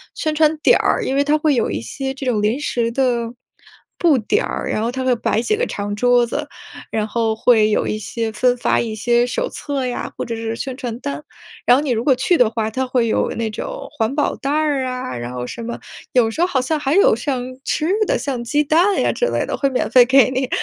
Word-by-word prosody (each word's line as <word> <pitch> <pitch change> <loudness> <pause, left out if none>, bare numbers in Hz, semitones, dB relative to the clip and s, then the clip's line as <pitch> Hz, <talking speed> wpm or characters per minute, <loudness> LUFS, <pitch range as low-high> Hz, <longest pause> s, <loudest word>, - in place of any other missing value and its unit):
宣 310 -1 -1
传 310 0 +3
点 305 - +4
儿， - - +1
因 265 - -1
为 280 - +3
它 295 +2 +2
会 305 -1 +2
有 235 - +1
一 - - -2
些 265 - -4
这 270 0 -7
种 235 -5 +1
临 215 +6 +1
时 235 -5 -1
的 235 -2 0 0.7
布 325 -6 +4
点 220 - 0
儿， - - -4
然 - - -1
后 230 +2 -1
它 260 +1 -3
会 255 -1 +2
摆 230 -1 0
几 430 - +1
个 465 - -2
长 205 0 -4
桌 245 +2 +3
子， 290 +5 -4 0.4
然 215 -1 -1
后 225 0 0
会 220 -1 +4
有 210 - +1
一 215 - -2
些 225 +1 -3
分 245 +3 +1
发 - - +1
一 225 -2 -3
些 240 +2 +2
手 - - -2
册 280 -3 -4
呀， 250 -1 -4
或 - - -3
者 230 - -4
是 225 0 -4
宣 265 +2 -5
传 245 -3 -5
单。 140 - -5 0.4
然 245 - +7
后 285 - -1
你 285 - -1
如 230 -1 0
果 265 0 +4
去 265 +8 +2
的 245 -8 +4
话， 220 -1 -2
它 260 +3 -2
会 250 -2 +1
有 220 - +1
那 230 -1 -1
种 - - -6
环 225 +2 0
保 295 - 0
袋 275 - -4
儿 295 -3 +1
啊， 255 - -4
然 120 +1 -5
后 125 -1 -4
什 235 - -7
么， 235 +1 -5 0.3
有 235 -3 +3
时 315 - -3
候 350 - +4
好 280 -7 0
像 300 +5 -1
还 285 +1 0
有 445 +6 +5
像 265 -4 -2 0.2
吃 305 - -1 0.2
的， - - +1
像 260 -4 -3
鸡 290 +5 +1
蛋 340 +7 +3
呀 - - +2
之 - - 0
类 - - -1
的， - - -3
会 275 - 0
免 260 - -1
费 245 +2 +7
给 260 +1 +4
你。 260 0 -1
250 Hz, 270 characters per minute, -19 LUFS, 230-285 Hz, 0.7 s, 然